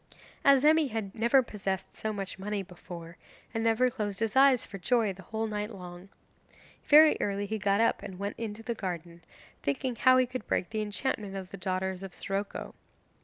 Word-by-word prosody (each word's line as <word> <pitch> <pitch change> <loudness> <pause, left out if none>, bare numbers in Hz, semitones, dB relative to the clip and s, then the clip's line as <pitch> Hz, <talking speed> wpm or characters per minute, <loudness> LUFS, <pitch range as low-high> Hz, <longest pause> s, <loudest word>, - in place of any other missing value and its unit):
Azemi 295 +3 +5
had 215 -4 -4
never 235 +4 +4
possessed 195 -4 -4
so 220 - -3
much 195 -2 -5
money 205 0 -2
before, 175 -2 -10 0.4
and 225 -1 -1
never 230 +3 +3
closed 210 -5 -3
his 225 0 -1
eyes 265 -2 +6
for 195 - -9
joy 225 0 +2
the 190 - -12
whole 220 +4 -3
night 210 -1 -3
long. 180 -2 -10 0.8
Very 305 +1 +8
early 200 0 -1
he 220 +2 -3
got 200 +1 +2
up 230 - +2
and 185 - -8
went 200 +2 -3
into 225 -1 -5
the 235 - -2
garden, 170 -4 -6 0.4
thinking 235 - -1
how 255 +3 +5
he 255 - +4
could 250 -2 -6
break 180 - -1
the 215 -1 -1
enchantment 210 -1 -2
of 190 -2 -6
the - - -6
daughters 185 0 -2
of 195 -2 -8
Siroco. 200 +1 -4
210 Hz, 185 wpm, -29 LUFS, 190-230 Hz, 0.8 s, Very